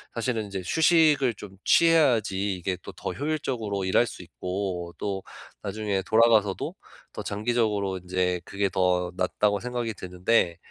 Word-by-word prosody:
사실은 115 -2 -1
인제 100 -2 -5
휴식을 155 - +4
좀 95 -2 -11
취해야지 115 - +3
이게 90 +1 -3
또 - - -8
더 - - -5
효율적으로 125 -10 -2
일할 95 +6 +3
수 - - -8
있고 90 -1 -4
또 95 -2 -3 0.4
나중에 105 -3 -2
돌아가서도 110 -3 +3 0.4
'더 - - -6
장기적으로 105 -3 0
인제 90 0 -1
그게 100 0 -1
더 90 -1 +1
낫다.'고 100 +2 +1
생각이 120 -1 -3
드는데 90 -1 0
100 Hz, 315 characters per minute, -26 LUFS, 95-115 Hz, 0.4 s, 휴식을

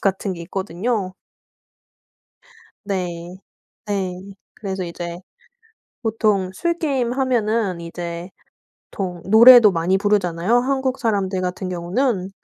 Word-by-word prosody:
같은 195 0 -1
게 170 - -8
있거든요. 190 +3 -3 1.7
네. 180 -2 -4 0.5
네. 195 -3 -2 0.4
그래서 190 -3 -4
이제 170 0 -6 0.8
보통 215 -4 +1
술 340 - -1
게임 265 -7 0
하면은 225 -8 0
이제 170 +1 -6 0.6
보통 180 -3 -4
노래도 230 0 +9
많이 175 +3 +1
부르잖아요, 200 +1 +1
한국 265 0 -1
사람들 195 -5 0
같은 185 +1 -3
경우는. 185 +3 -1
195 Hz, 220 characters per minute, -21 LUFS, 180-230 Hz, 1.7 s, 노래도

